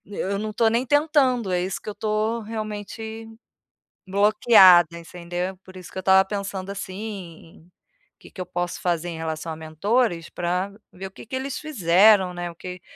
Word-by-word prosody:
N 205 - -11
eu 200 +1 -2
não 215 +1 -3
estou 225 +1 +2
nem 235 +2 +1
tentando, 270 -6 +2
é 180 -1 +1
isso 185 +1 -3
que - - -18
eu - - -5
estou 215 +2 -1
realmente 220 +1 -6 0.8
bloqueada, 190 -4 +6
entendeu? 175 +2 -5
Por 185 0 -13
isso 180 -1 -10
que - - -10
eu - - -2
estava 190 +1 +5
pensando 195 -1 -4
assim, 190 -4 -8 0.5
que - - -15
que 185 - -8
eu - - -4
posso 175 0 -4
fazer 175 -1 -1
em 165 - -6
relação 160 0 -4
a - - -5
mentores, 165 +4 -1
pra 180 +2 -2 0.2
ver 190 +1 -8
o - - -14
que 195 - -13
que 245 - -6
eles 265 +2 -3
fizeram, 195 - +4
né, 175 0 -5
o - - -17
que 180 +1 -8
190 Hz, 185 wpm, -23 LUFS, 175-220 Hz, 0.8 s, bloqueada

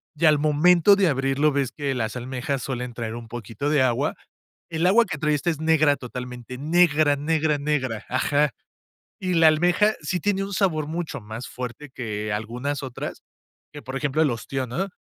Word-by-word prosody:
y 155 - +1
al 155 -1 +6
momento 170 +6 +5
de 195 -2 +3
abrirlo, 135 +1 +2
ves 140 -3 0
que 140 -2 -2
las 110 -2 -2
almejas, 130 +2 -3
suelen 125 -2 -4
traer 115 -1 -4
un 120 -1 -8
poquito 115 +4 -4
de 150 -2 +3
agua. 125 -2 +1 0.6
El 165 +1 +1
agua 230 +5 +5
que - - -4
trae 150 -2 +2
esta, 145 +4 -1
es 155 - -5
negra, 155 -2 +4
totalmente 125 0 -7
negra, 155 0 +3
negra, 155 +1 +1
negra. 130 -7 -1
Ajá. 145 +3 +2 0.7
Y 185 -1 -1
la 165 -1 +6
almeja, 175 +7 +3
sí 180 +4 -2
tiene 195 +2 0
un 200 0 -5
sabor 165 -7 +1
mucho 160 -3 -4
más 110 +3 -7
fuerte, 125 +3 -7
que 105 -3 -4
algunas 125 +7 -3
otras, 130 -3 -6 0.5
que 145 - -8
por 130 - -6
ejemplo, 145 +3 0
el 150 -4 +3
ostión, 130 +2 -4
¿no? 175 +11 -2
145 Hz, 185 wpm, -24 LUFS, 125-160 Hz, 0.7 s, al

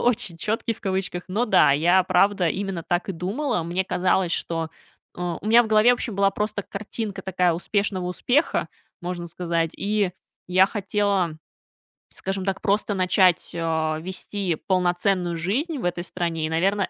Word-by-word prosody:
Очень 240 -7 0
"чёткий", 225 +5 -1
в - - -20
кавычках. 190 -2 -2
Но 215 +6 +1
да, 190 -10 +5
я 175 +6 +4
правда 185 -1 +3
именно 190 -2 -3
так 175 +3 -1
и 195 - -1
думала. 200 - -2
Мне 175 +3 -1
казалось, 180 -1 +1
что 165 -1 -2 0.5
а, 175 -2 -3
у 210 - -8
меня 235 +2 +7
в - - -4
голове, 215 +2 +5
вообще, 240 -2 -3
была 195 0 +3
просто 210 0 -2
картинка 215 0 -5
такая 180 -2 +1
успешного 185 +1 -1
успеха, 255 - +1 0.3
можно 175 -1 -4
сказать, 170 -1 -1
и 205 -2 0 0.4
я 185 +1 +5
хотела, 200 -5 0 0.8
скажем 195 0 -4
так, 195 -1 -2
просто 205 +1 +1
начать, 185 -2 +3
а, 160 -2 0
вести 185 0 -3
полноценную 180 -1 +1
жизнь 270 - -1
в 240 - -5
этой 175 -1 -1
стране, 165 -2 -2
и, - - -2
наверное, 195 +5 +1
185 Hz, 160 wpm, -24 LUFS, 175-205 Hz, 0.8 s, меня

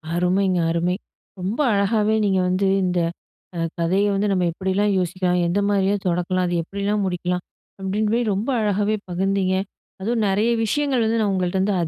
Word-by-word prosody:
அருமைங்க. 180 +1 +2
அருமை. 170 +2 0 0.4
ரொம்ப 195 +7 -3
அழகாவே 210 +2 +2
நீங்க 190 -2 +2
வந்து 190 +2 +1 0.2
இந்த 180 -1 +1 0.6
அ - - -2 0.2
கதைய 185 +4 +2
வந்து 200 +1 +1
நம்ம 185 -2 +1
எப்படிலாம் 190 +4 0
யோசிக்கலாம்? 180 0 0
எந்த 175 +4 +1
மாதிரியா 200 0 +2
தொடக்கலாம்? 180 +1 0
அது 175 - -1
எப்படிலாம் 200 +3 -2
முடிக்கலாம்? 180 -1 -2 0.4
அப்டின்னு 205 +3 0
போயி 240 +1 +2
ரொம்ப 210 +7 -2
அழகாவே 210 +1 +1
பகிர்ந்தீங்க. 190 +1 0 0.5
அதுவும் 225 +2 0
நெறைய 205 +4 +2
விஷயங்கள் 265 +1 +1
வந்து 225 +1 +1
நான் 205 -2 +1
உங்கள்ட்ட 185 0 0
வந்து 195 +2 +1
195 Hz, 155 wpm, -22 LUFS, 180-205 Hz, 0.6 s, அருமைங்க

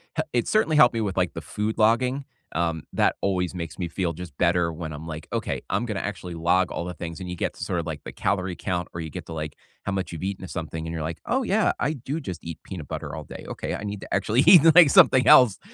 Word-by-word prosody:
he 155 - 0
it 120 - +1
certainly 165 -8 +2
helped 120 -4 +7
me 115 - -1
with, 100 -3 -3
like, 90 -2 +1
the 80 - -6
food 105 +7 -3
logging. 125 +5 +2 0.3
Um, 85 -2 -1
that - - +2
always 90 -3 0
makes 85 -3 -6
me 85 -2 -3
feel 85 0 -2
just 85 -3 -9
better 85 -1 +2
when 80 -1 -6
I'm, 75 +2 -8
like, 80 -1 -7
"Okay, - - -2
I'm 115 - 0
gonna 110 -4 -3
actually 95 -4 -5
log 85 +3 +2
all 85 - -3
the 90 - -5
things," 85 0 -7
and 90 -1 -6
you 90 - -4
get - - -2
to - - -6
sort 90 -2 -1
of, - - -9
like, 80 -3 -5
the - - -7
calorie 95 -2 -1
count 90 -2 -3
or 85 - -5
you 80 - -5
get - - -7
to, 80 - -8
like, 75 -1 -5 0.3
how 100 - -2
much 95 -3 -3
you've 80 - -6
eaten 95 0 -3
of - - -10
something 80 -1 -5
and 80 - -5
you're, 80 -2 -3
like, 80 +1 -4
"Oh, 260 +2 0
yeah, 215 -1 +2
I 150 - +1
do 140 +3 -5
just 90 - -6
eat 85 -2 -6
peanut 85 -7 -8
butter - - -5
all - - -6
day. - - -9
Okay, - - -4
I - - -6
need 105 -1 -4
to - - -7
actually 115 +4 +2
eat, 180 -5 +10
like, 175 -4 +8
something 130 -1 +6
else." 120 -6 +7
90 Hz, 275 wpm, -25 LUFS, 85-110 Hz, 0.3 s, eat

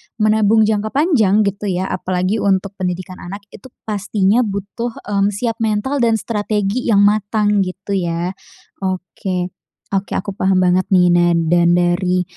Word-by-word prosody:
menabung 215 0 +3
jangka 215 0 0
panjang 225 - +3
gitu 200 +1 -2
ya. 185 0 -2
Apalagi 185 +3 -1
untuk 195 -1 +1
pendidikan 185 0 -4
anak 200 +3 -8
itu 230 - -12 0.2
pastinya 205 0 +1
butuh, 205 +4 -4
mmm, 200 -1 +1
siap 230 +1 -2
mental 225 +5 -1
dan 230 -2 +3
strategi 210 +1 -2
yang 205 -3 +4
matang 210 0 +2
gitu 190 +1 -3
ya. 175 -2 -1 0.5
Oke. 185 -1 -3 0.4
Oke, 195 0 -2
aku 200 - -3
paham 190 -1 +1
banget 180 +1 +2
nih. 185 -3 +4
Nah 175 0 +4 0.2
dan 175 0 +4
dari, 180 +1 +1
200 Hz, 145 wpm, -18 LUFS, 185-215 Hz, 0.5 s, yang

